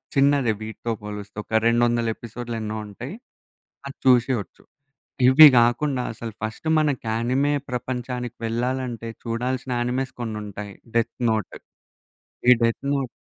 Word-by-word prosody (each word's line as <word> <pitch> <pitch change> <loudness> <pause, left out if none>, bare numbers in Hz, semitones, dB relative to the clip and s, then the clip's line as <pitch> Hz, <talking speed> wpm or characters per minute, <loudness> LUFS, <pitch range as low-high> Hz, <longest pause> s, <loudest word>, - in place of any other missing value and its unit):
చిన్నదే 140 -3 +4
వీటితో 110 +2 -5
పోలుస్తే 105 0 -8
ఒక - - -30 0.2
200 120 0 +2
ఎపిసోడ్లు 120 0 -6
ఎన్నో 110 0 -4
ఉంటాయి, 120 - -8 0.7
అది 140 - -8
చూసేయొచ్చు. 125 -3 +2 0.6
ఇవి 145 +4 +10
గాకుండా 125 +3 +3
అసలు 115 0 -7
ఫస్ట్ 110 +7 -5
మనకి 145 -5 0
యానిమే 125 +6 +1 0.2
ప్రపంచానికి 125 -1 -4
వెళ్ళాలంటే 120 0 -2 0.2
చూడాల్సిన 125 +2 -2
యానిమేస్ 125 +2 -1
కొన్నుంటాయి 105 -3 -5 0.2
'డెత్ 115 -1 0
నోట్.' 110 -3 -2 0.9
ఈ - - +11
'డెత్ 115 +3 0
నోట్' 135 -3 -1
120 Hz, 120 wpm, -24 LUFS, 115-130 Hz, 0.9 s, ఈ